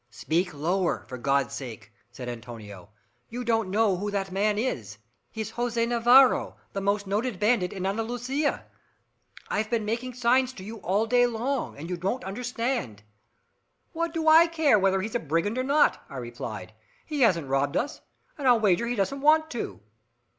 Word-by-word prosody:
"Speak 170 - -1
lower, 160 - 0
for 130 +1 -7
God's 140 +2 +1
sake," 110 -5 -8 0.2
said 125 0 -8
Antonio. 115 -5 -9 0.4
"You 245 +2 -5
don't 225 -4 +1
know 205 -1 +2
who 205 +3 -3
that 195 -2 -2
man 205 +2 +1
is. 115 - -3 0.3
He's 220 -1 -5
Jose 235 -1 -1
Navarro, 240 +3 +5 0.2
the 195 - -3
most 200 +1 0
noted 205 +1 -2
bandit 210 -4 +2
in 190 -2 -5
Andalusia. 245 +8 -1 0.8
I've 215 +1 -1
been 230 -3 0
making 235 +3 -3
signs 250 +1 +2
to 185 - -10
you 220 +3 -7
all 205 +2 0
day 245 +1 +4
long, 240 - -2
and 155 +4 -7
you 180 0 -3
wouldn't 195 +9 -2
understand." 230 - -3 0.9
"What 335 0 -1
do 325 -1 -2
I 325 +2 +8
care 315 -9 +3
whether 195 0 +2
he's 215 +3 -5
a 240 - +1
brigand 165 - -1
or - - 0
not," 285 +3 +3
I 135 - -8
replied. 120 -5 -7 0.3
"He 300 -3 -3
hasn't 175 - +3
robbed 135 +1 0
us, 285 - -3 0.4
and 275 - -1
I'll 245 -2 +6
wager 210 +2 +2
he 245 - -1
doesn't 255 +7 -1
want 315 +2 +4
to." 230 - -5
215 Hz, 175 wpm, -26 LUFS, 170-245 Hz, 0.9 s, I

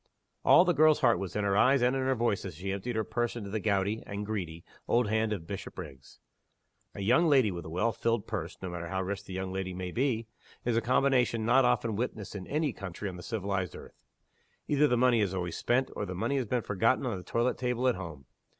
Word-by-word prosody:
All 175 - +7
the 175 - +3
girl's 155 -1 +5
heart 120 -4 +4
was 95 -2 -5
in 105 - 0
her 100 -1 +1
eyes 130 +4 +4
and 125 +2 +3
in 135 - 0
her 130 0 +1
voice 115 -4 0
as 95 -4 -6
she 95 +4 -4
emptied 100 +5 -3
her 110 - +1
purse 120 +2 -2
into 100 -4 -6
the 110 - -1
gouty 100 +1 0
(and 100 +1 -4
greedy) 90 -6 -4 0.2
old 120 -1 +3
hand 110 +1 +1
of 95 -6 -3
Bishopriggs. 85 -7 -8 0.8
A - - -5
young 125 - +4
lady 130 -8 +4
with 85 -1 -6
a - - -7
well 90 +8 +1
filled 115 0 -1
purse 95 -6 -4
(no 95 - -3
matter 85 -1 -5
how 95 +1 -2
rich 100 +2 -4
the 95 - -8
young 95 0 -3
lady 95 -1 -3
may 90 0 -4
be) 120 -2 0 0.4
is 120 -1 +1
a 115 - +3
combination 125 -2 +2
not 125 +3 +5
often 115 -3 +1
witnessed 110 -3 -4
in 95 -2 -6
any 150 -3 0
country 100 +1 -6
on 90 - -8
the 90 - -8
civilized 95 -3 -3
earth. - - -13 0.7
Either 150 0 +4
the 125 - +2
money 120 -2 +4
is 95 -2 0
always 90 -2 -3
spent, 130 +2 +1
or 105 - -3
the 90 - -5
money 140 +10 -1
has 130 - 0
been 120 +1 0
forgotten 115 +7 +1
on 120 -5 -1
the 90 - -6
toilet 120 +5 0
table 125 0 0
at 125 - +4
home. 80 - -8
110 Hz, 240 wpm, -30 LUFS, 95-125 Hz, 0.8 s, All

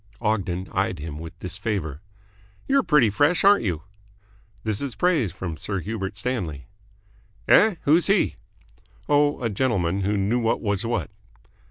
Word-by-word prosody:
Ogden 100 -5 -1
eyed 95 -1 -1
him 75 0 -7
with 80 +1 -9
disfavour. 90 - -4 0.7
"You're 275 0 +4
pretty 150 - +4
fresh, 145 - +2
aren't 200 -5 +6
you?" 85 -7 -2 0.8
"This 110 -2 -2
is 135 -5 -4
praise 155 - +1
from 85 -2 -6
Sir 100 +5 -3
Hubert 100 0 -4
Stanley." 95 - -3 0.8
"Eh? 215 -2 +6
Who's 160 +4 +4
he?" 200 0 +2 0.7
"Oh, 145 0 +3
a 115 - +1
gentleman 100 -5 0
who 100 +2 0
knew 105 +5 +1
what 115 -1 +1
was 100 -1 -1
what." 115 -2 -2
105 Hz, 145 wpm, -24 LUFS, 90-130 Hz, 0.8 s, aren't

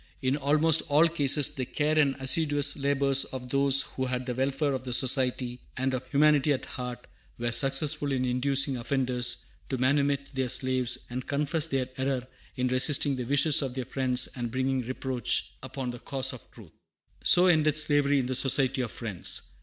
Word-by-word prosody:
In 130 +1 0
almost 150 +3 +2
all 150 +4 +5
cases 145 -3 +2
the 130 - -4
care 150 +4 0
and 140 -2 +2
assiduous 145 +1 +4
labors 140 -1 +1
of 125 -1 -8
those 140 +1 +4
who 130 0 -5
had 125 0 -3
the 125 - -3
welfare 135 +3 -1
of 130 - -4
the 125 -1 -4
Society 125 -1 0 0.2
and 130 0 -1
of 130 0 -4
humanity 150 0 +3
at 135 - -4
heart 125 -1 -7 0.3
were 120 0 -2
successful 140 +4 0
in 130 -1 -1
inducing 135 +2 0
offenders 125 -1 -1 0.2
to 130 - -2
manumit 140 +2 0
their 130 -1 -2
slaves, 130 -1 +1
and 125 +1 -5
confess 150 +2 -1
their 130 -2 -2
error 130 -1 -1 0.3
in 125 0 -1
resisting 135 +2 +1
the 125 -1 -5
wishes 145 +3 +2
of 130 -3 -4
their 130 -2 -4
friends 130 -1 0
and 120 -2 -4
bringing 130 +2 -1
reproach 130 0 -2
upon 130 -2 -5
the 120 - -9
cause 135 0 -3
of 125 - -13
truth. - - -15 0.5
So 180 - +6
ended 155 -4 +3
slavery 145 -2 +3
in 130 - 0
the 130 - -3
Society 130 0 +2
of 120 - -3
Friends. 105 -7 -4
135 Hz, 180 wpm, -27 LUFS, 125-145 Hz, 0.5 s, So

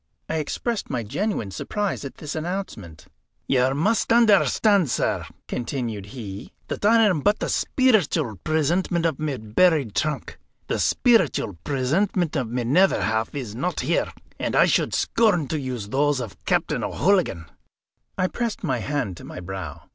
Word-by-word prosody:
I 160 - -2
expressed 210 +9 -3
my 120 -2 -2
genuine 115 - -2
surprise 205 - -3
at 140 - -7
this 150 -1 -6
announcement. 155 - -5 0.4
"You 130 0 +3
must 210 +10 +1
understand, 210 - +4
sir," - - -1 0.2
continued 115 -5 -4
he, 105 -2 -8 0.2
"that - - -4
I 225 +2 +5
am 190 -7 +3
but 205 +8 +3
the - - -3
speeritual 210 - +2
presentment 165 +2 +1
of 160 -5 0
my 150 -3 -2
buried 125 - +2
trunk. 155 +6 -2 0.3
The - - -2
speeritual 180 - +2
presentment 160 +6 0
of 130 -6 -1
my 125 +1 -2
nether 180 +11 +3
half 110 +4 -1
is 125 -7 -5
not 155 +11 -2
here, - - 0 0.3
and - - -1
I - - +6
should - - +1
scorn 205 -10 +2
to 155 - -1
use 125 -7 -5
those 145 +2 +1
of 115 -6 -8
Captain - - 0
O'Hooligan." 175 - +1 0.7
I - - +2
pressed 230 +3 -3
my 130 -8 0
hand 115 - -2
to - - -11
my - - -8
brow. 95 +1 -7
145 Hz, 155 wpm, -24 LUFS, 120-190 Hz, 0.7 s, I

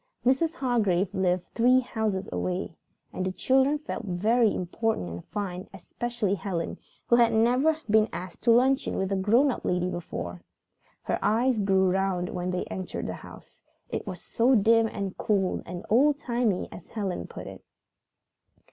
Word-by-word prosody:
Mrs. 315 +6 +2
Hargrave 205 - +1
lived 185 -2 +1
three 250 +2 +5
houses 220 -6 -2
away, 180 -1 -2 0.4
and 185 - -3
the 185 - -1
children 265 +8 +2
felt 295 -4 -6
very 215 +4 +2
important 185 - -2
and 85 +1 -7
fine, 185 -3 -5
especially 230 +2 -3
Helen, 185 -4 -3 0.3
who 235 - +4
had 235 -1 +5
never 250 +8 +3
been 215 0 +4
asked 185 0 -7
to 235 - +4
luncheon 260 +4 +3
with 190 0 -1
a - - +2
grown 230 +9 +3
up - - -6
lady 180 0 0
before. 90 - -5 0.6
Her - - -1
eyes 225 +4 +2
grew 190 -1 +3
round 190 -2 0
when 180 0 -3
they 180 0 -1
entered 185 -1 -5
the - - -3
house. - - -13 0.3
It - - -4
was - - -5
so 250 +3 +2
dim 225 +1 +4
and 200 -3 -4
cool 195 -3 +1
and 175 +1 -7
"old 275 +6 +4
timey" 235 -8 0
as 175 - -11
Helen 200 -5 -3
put - - -9
it. - - -10
210 Hz, 165 wpm, -27 LUFS, 185-240 Hz, 0.6 s, three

